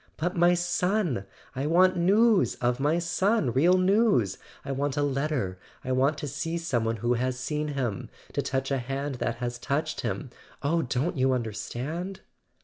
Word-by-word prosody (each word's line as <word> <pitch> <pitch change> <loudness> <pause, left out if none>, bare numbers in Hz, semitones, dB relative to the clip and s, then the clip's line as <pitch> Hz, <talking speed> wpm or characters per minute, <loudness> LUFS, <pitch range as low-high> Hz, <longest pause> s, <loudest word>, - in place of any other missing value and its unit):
"But 175 +3 -1
my 175 +1 +5
son! 175 - 0 0.3
I 135 +3 -1
want 185 +3 +5
news 205 +4 +4
of 120 +1 0
my 150 +4 +2
son, 175 - +1
real 175 +8 +4
news; 185 - +3 0.3
I 140 - -3
want 140 +1 -1
a 145 - +2
letter; 135 -9 -1 0.3
I 130 - -2
want 135 +4 +2
to 150 - -4
see 155 +4 -3
some 135 -9 -1
one 115 0 0
who 120 +2 0
has 125 +1 -1
seen 150 +3 -2
him! 130 -8 -3 0.2
To - - 0
touch 135 +1 -2
a 135 - +1
hand 135 +1 -4
that 120 - 0
has 120 0 -4
touched 155 +5 -2
him! 135 -5 -3 0.3
Oh, 165 +4 +2
don't 140 +7 -1
you 130 0 +3
understand 130 - -4
145 Hz, 175 wpm, -27 LUFS, 125-175 Hz, 0.3 s, my